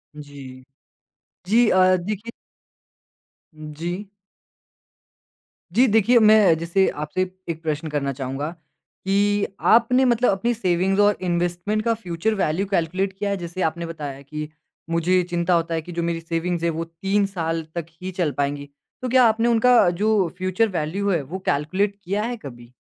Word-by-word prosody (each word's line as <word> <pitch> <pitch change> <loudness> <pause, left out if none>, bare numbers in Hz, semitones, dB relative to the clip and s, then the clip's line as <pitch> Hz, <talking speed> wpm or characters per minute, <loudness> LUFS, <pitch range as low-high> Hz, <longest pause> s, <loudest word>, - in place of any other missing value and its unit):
जी। 140 -3 -11 0.8
जी 225 +4 +4
अ, 185 0 +5
देखिए 210 +5 -5 1.2
उ, 155 0 -9
जी। 180 +4 -3 1.7
जी, 245 +8 +4
देखिए 225 +3 +4
मैं 215 -6 +6
जैसे 170 +4 +1
आपसे, 150 +5 -3 0.3
एक 165 0 -4
प्रश्न 155 0 -2
करना 140 -2 -1
चाहूँगा 135 +3 -4
कि, 200 +5 -2
आपने 250 +3 +4
मतलब 245 0 +3
अपनी 230 +5 0
सेविंग्स 190 -1 0
और 205 0 +3
इन्वेस्टमेंट 175 +4 -1
का 230 - +3
फ्यूचर 190 0 -2
वैल्यू 190 0 0
कैलकुलेट 190 +2 0
किया 205 0 -2
है। 200 - -1
जैसे 175 +1 -6
आपने 170 +1 -1
बताया 145 -4 -7
कि 150 +2 -6 0.4
मुझे 170 +2 +2
चिंता 175 +1 0
होता 165 0 +1
है 160 - -1
कि 175 - -10
जो 170 0 -3
मेरी 170 0 -1
सेविंग्स 165 +1 -3
है, 170 - +2
वो 165 0 -3
3 195 +5 -1
साल 165 -4 -3
तक 170 -2 -3 0.2
ही 185 +1 -4
चल 175 -5 -1
पाएँगी। 145 0 -2 0.3
तो 255 - -3
क्या 255 0 +5
आपने 225 +1 +2
उनका 235 -3 +5
जो 200 +1 +1
फ्यूचर 185 +4 +1
वैल्यू 190 +7 -2
है, 170 -5 +1
वो 160 +8 -7
कैलकुलेट 185 +8 0
किया 200 +4 -1
है 240 +1 -3
कभी? 120 - -12
180 Hz, 160 wpm, -22 LUFS, 160-205 Hz, 1.7 s, मैं